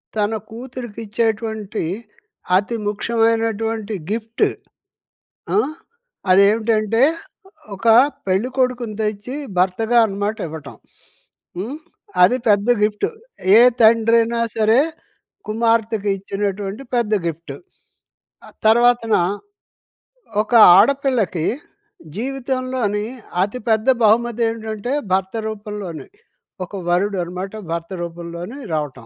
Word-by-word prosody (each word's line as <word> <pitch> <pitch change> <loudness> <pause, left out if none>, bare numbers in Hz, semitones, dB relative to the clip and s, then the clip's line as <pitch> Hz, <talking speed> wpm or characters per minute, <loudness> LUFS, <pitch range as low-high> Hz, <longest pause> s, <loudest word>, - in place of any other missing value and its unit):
తన 210 0 0 0.2
కూతురికిచ్చేటువంటి 225 -3 -4 0.7
అతి 205 +4 -2
ముఖ్యమైనటువంటి 225 0 0 0.2
గిఫ్ట్ 225 +1 -2 1.1
ఆ! - - +6 0.7
అదేవిటంటే, 215 +3 +3 0.7
ఒక 225 +4 -4 0.4
పెళ్ళికొడుకుని 245 +3 0
తెచ్చి 215 +4 -3 0.2
భర్తగా 205 +6 +2
అనమాట 205 +1 -3
ఇవ్వటం. 150 -6 -9 0.8
హ్మ్. 230 +11 -4 0.5
అది 205 +8 +5
పెద్ద 205 +1 +3 0.2
గిఫ్టు. 210 0 0 0.5
ఏ - - +8 0.2
తండ్రయినా 230 +1 +4 0.2
సరే, 220 +2 +4 0.7
కుమార్తెకు 225 -2 +1
ఇచ్చినటువంటి 200 +3 -4
పెద్ద 230 -3 +1
గిఫ్టు. 165 +1 -6 0.9
ఆహ్, - - -16
తర్వాతన 235 0 +4 1.3
ఒక 220 - -8 0.3
ఆడపిల్లకి 255 - +1 0.7
జీవితంలోని 255 -4 -2 0.4
అతి 205 +6 -4
పెద్ద 220 +2 +1 0.2
బహుమతేంటంటే, 225 0 0 0.2
భర్త 190 0 0
రూపంలోనే. 210 -5 -6 0.6
ఒక 195 - -9
వరుడు 190 +3 +1
అనమాట 180 +3 -6 0.2
భర్త 170 0 -3
రూపంలోనే 170 +6 -7 0.2
రావటం. 145 -6 -3
220 Hz, 85 wpm, -20 LUFS, 200-230 Hz, 1.3 s, ఏ